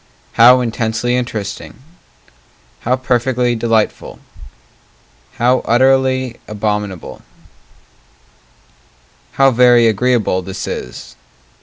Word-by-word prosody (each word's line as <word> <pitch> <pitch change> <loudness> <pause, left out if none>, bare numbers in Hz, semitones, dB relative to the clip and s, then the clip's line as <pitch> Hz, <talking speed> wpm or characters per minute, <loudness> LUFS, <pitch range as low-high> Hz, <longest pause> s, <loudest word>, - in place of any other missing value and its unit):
How 125 +2 +6
intensely 115 0 -2
interesting! 115 -5 -5 1.0
How 125 +2 0
perfectly 125 -1 0
delightful! 115 -1 -1 1.2
How 125 +2 +1
utterly 130 0 +1
abominable 105 -3 -4 2.1
How 135 0 +3
very 120 -1 +4
agreeable 110 -3 0
this 95 +1 -7
is! 60 - -8
120 Hz, 70 wpm, -16 LUFS, 110-125 Hz, 2.1 s, How